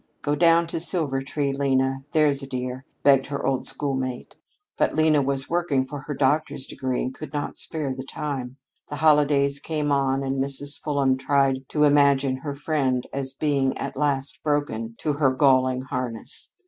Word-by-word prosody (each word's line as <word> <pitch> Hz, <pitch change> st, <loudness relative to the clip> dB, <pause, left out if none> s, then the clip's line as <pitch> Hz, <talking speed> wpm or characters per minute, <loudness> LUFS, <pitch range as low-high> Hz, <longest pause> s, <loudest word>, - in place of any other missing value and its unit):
"Go 145 Hz, -, 0 dB
down 170 Hz, +1 st, +4 dB
to 165 Hz, -, -4 dB
Silvertree, 140 Hz, -4 st, -1 dB
Lena, 135 Hz, -1 st, 0 dB
there's 150 Hz, -3 st, +3 dB
a 135 Hz, -, -6 dB
dear," 130 Hz, 0 st, -5 dB, 0.2 s
begged 135 Hz, -1 st, +4 dB
her 140 Hz, 0 st, -4 dB
old 135 Hz, -1 st, 0 dB
schoolmate. 130 Hz, -3 st, -3 dB, 0.4 s
But -, -, 0 dB
Lena 155 Hz, -2 st, +3 dB
was 135 Hz, 0 st, +1 dB
working 165 Hz, -6 st, 0 dB
for 145 Hz, +2 st, -7 dB
her 145 Hz, -, -3 dB
doctor's 140 Hz, 0 st, 0 dB
degree 130 Hz, -3 st, -3 dB
and 130 Hz, -, -4 dB
could 155 Hz, -, -9 dB
not 145 Hz, -, -3 dB
spare 150 Hz, -5 st, -1 dB
the 130 Hz, 0 st, -7 dB
time. 135 Hz, -3 st, -5 dB, 0.3 s
The 145 Hz, -, -4 dB
holidays 145 Hz, -2 st, +3 dB
came 150 Hz, -1 st, -2 dB
on, 135 Hz, -1 st, +1 dB
and 135 Hz, 0 st, -1 dB
Mrs. 140 Hz, +1 st, +1 dB
Fulham 140 Hz, -3 st, +1 dB
tried 135 Hz, -1 st, +1 dB
to 150 Hz, -, +1 dB
imagine 140 Hz, -2 st, +3 dB
her 140 Hz, +1 st, -6 dB
friend 140 Hz, -4 st, -1 dB
as 135 Hz, -1 st, -3 dB
being 140 Hz, -2 st, 0 dB
at -, -, -5 dB
last 140 Hz, -1 st, 0 dB
broken 115 Hz, -7 st, -2 dB
to 150 Hz, -, 0 dB
her 140 Hz, -2 st, +2 dB
galling 130 Hz, -1 st, +2 dB
harness. 125 Hz, -2 st, -4 dB
140 Hz, 170 wpm, -24 LUFS, 130-145 Hz, 0.4 s, down